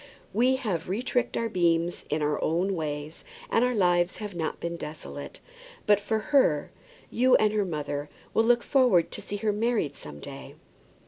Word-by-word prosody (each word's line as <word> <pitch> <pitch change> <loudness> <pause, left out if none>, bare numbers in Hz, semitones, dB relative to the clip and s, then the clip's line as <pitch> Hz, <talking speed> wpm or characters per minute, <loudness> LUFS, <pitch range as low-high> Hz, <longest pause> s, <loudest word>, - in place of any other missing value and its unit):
"We 250 +5 +3
have 215 - -2
retricked 245 +6 -1
our 230 - 0
beams 170 -3 +1
in 150 0 0
our 150 0 0
own 180 +5 +1
ways, 150 -1 -4 0.3
and 230 - +3
our 250 0 +1
lives 175 -3 +2
have 210 -2 -6
not 160 -2 -3
been 170 0 -3
desolate. 160 - -8 0.4
But 205 -1 +5
for 215 +2 -1 0.2
her, 165 - +3 0.4
you 255 +2 +4
and 215 0 +3
her 210 -2 +1
mother 145 -3 -4 0.2
will 225 - +3
look 240 0 +4
forward 250 -11 +3
to - - -6
see 205 - -6
her 210 0 0
married 210 - 0
some 75 -1 -9
day." - - -9
190 Hz, 175 wpm, -27 LUFS, 160-230 Hz, 0.4 s, But